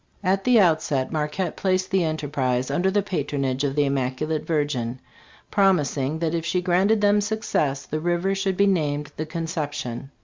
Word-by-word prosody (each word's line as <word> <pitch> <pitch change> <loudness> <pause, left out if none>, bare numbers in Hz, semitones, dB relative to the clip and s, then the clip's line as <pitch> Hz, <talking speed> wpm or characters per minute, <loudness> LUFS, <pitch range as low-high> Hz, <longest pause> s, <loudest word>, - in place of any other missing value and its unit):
"At 190 +1 +1
the 250 -2 +5
outset. 155 -7 +2
Marquette 155 +4 -2
placed 185 -1 0
the 190 -2 +3
enter 155 -2 -2
prise 130 -2 -1
under 175 +7 +1
the 205 +1 +1
patronage 140 -7 -2
of 140 -1 -1
the 145 -1 +3
Immaculate 140 +3 -1
Virgin, 145 -7 -1 0.5
promis 190 -8 +3
ing 140 +2 -1
that 160 0 -1
if 165 -1 -1
she 180 +2 0
granted 190 +4 +2
them 205 0 +4
success, 200 -10 -1
the 155 - -3
river 175 +3 0
should 195 -1 -1
be 200 - +4
named 150 -6 0
' - - -35
The 155 - -3
Conception.' 150 -6 -4
160 Hz, 180 wpm, -24 LUFS, 145-190 Hz, 0.5 s, the